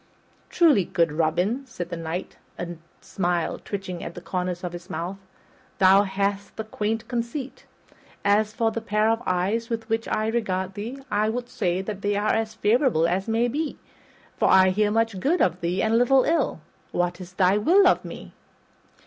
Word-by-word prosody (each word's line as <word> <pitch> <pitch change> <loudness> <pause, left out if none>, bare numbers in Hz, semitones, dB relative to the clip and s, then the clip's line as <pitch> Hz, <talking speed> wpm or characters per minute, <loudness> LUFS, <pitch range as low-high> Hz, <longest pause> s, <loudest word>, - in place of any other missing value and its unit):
"Truly, 305 - +4
good 165 -2 +1
Robin," 175 - 0
said 180 -9 -6
the - - -2
Knight, 165 +2 -5 0.2
a 175 - -4 0.3
smile 175 -3 -1
twitching 190 -3 -5
at 170 - -7
the - - -6
corners 180 0 -3
of 175 -1 -4
his 175 +2 -9
mouth, 185 +2 -4 0.6
"thou 190 +1 +6
hast 200 +1 -2
a - - -1
quaint 220 +1 -3
conceit. 245 +3 -4 0.6
As 210 +1 +3
for 225 +1 0
the 230 - -4
pair 215 0 +2
of 225 +1 -1
eyes 195 +6 0
with 225 -1 -3
which 225 +1 -1
I 215 - 0
regard 190 -5 -1
thee, 225 +7 -6
I 210 +1 +2
would 245 +2 -4
say 185 -2 -1
that 200 0 -5
they 205 0 0
are 205 +1 +1
as 220 0 -1
favorable 220 - +2
as 185 +4 -1
may 225 +2 +2
be, 295 +5 -3 0.6
for - - +2
I 190 0 +6
hear 205 +3 +2
much 225 -2 0
good 325 - +1
of 180 0 +1
thee 175 +2 0
and 225 +1 +3
little 260 +2 +5
ill. 305 - 0 0.3
What 175 +1 -1
is 180 0 -10
thy 185 +1 +3
will 365 - +5
of 365 - +4
me?" - - -9
205 Hz, 185 wpm, -25 LUFS, 180-225 Hz, 0.6 s, thou